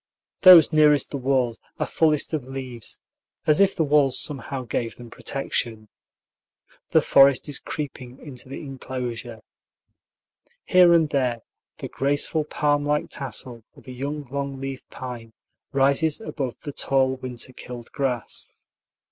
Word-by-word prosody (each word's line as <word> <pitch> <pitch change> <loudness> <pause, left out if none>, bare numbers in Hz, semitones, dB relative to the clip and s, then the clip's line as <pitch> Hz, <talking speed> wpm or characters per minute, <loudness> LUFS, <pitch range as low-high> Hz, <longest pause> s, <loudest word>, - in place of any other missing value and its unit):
Those 175 -4 +9
nearest 150 -2 +4
the 140 - -2
walls 125 -3 0 0.2
are - - +1
fullest 155 -1 +1
of 150 -5 -2
leaves, 130 -4 -7 0.5
as 155 -1 +4
if 195 -1 +4
the 165 - +1
walls 145 -3 +3
somehow 135 -2 -3
gave 115 -1 -3
them 120 -1 -12
protection. 115 -5 -3 1.0
The - - +4
forest 135 -1 +5
is 145 - -2
creeping 130 -4 -7
into 130 -4 -8
the 135 - -6
inclosure. 125 -5 -6 1.2
Here 180 -1 +6
and 165 -2 +5
there 125 -4 0 0.4
the - - -6
graceful 145 +3 0
palm 145 -1 0
like 150 0 -1
tassel 125 -3 -6
of - - -17
a 130 - -9
young 140 +4 -4
long 140 -1 -4
leaved 135 -1 -6
pine 120 -3 -8 0.4
rises 140 +3 +2
above 135 - -5
the 145 - -6
tall 130 -1 +1
winter 130 0 -6
killed 120 -2 -10
grass. 130 -5 -3
135 Hz, 140 wpm, -24 LUFS, 125-150 Hz, 1.2 s, Those